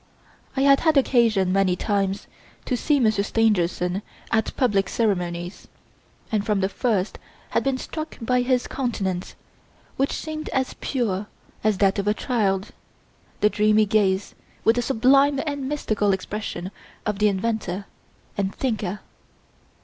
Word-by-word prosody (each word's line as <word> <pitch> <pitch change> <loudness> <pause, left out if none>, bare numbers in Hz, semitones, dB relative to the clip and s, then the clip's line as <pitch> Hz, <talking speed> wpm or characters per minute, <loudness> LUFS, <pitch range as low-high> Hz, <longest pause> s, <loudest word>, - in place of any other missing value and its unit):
I - - +2
had 275 0 +6
had 315 -3 +3
occasion, 225 -8 +3
many 195 -2 +3
times, 200 0 -1 0.4
to 255 - 0
see 290 +3 +2
Monsieur 215 -4 +3
Stangerson 190 -4 +1 0.3
at 220 0 +1
public 200 -7 +2
ceremonies, 175 -5 -2 0.6
and 215 -2 +1
from 210 -2 +1
the 190 - +1
first 205 -2 -1 0.3
had - - +1
been 270 -1 +1
struck 310 +4 -6
by 250 +1 +1
his 250 0 +1
countenance, 195 -9 -3 0.6
which 270 +1 +1
seemed 310 -1 -5
as 260 -1 -1
pure 210 -7 -1 0.4
as 215 -2 +2
that 195 0 +3
of 200 - -2
a 210 - +3
child 200 -7 0 0.7
the 210 - +5
dreamy 215 0 +4
gaze 200 -2 +1 0.3
with 225 +2 +4
the - - +3
sublime 275 +3 +4
and 285 -3 -3
mystical 215 -9 +1
expression 190 -1 -4 0.3
of 210 -2 -1
the 210 - +4
inventor 200 -1 -1 0.5
and 195 -1 -1
thinker. 215 -6 -2
215 Hz, 140 wpm, -24 LUFS, 195-250 Hz, 0.7 s, had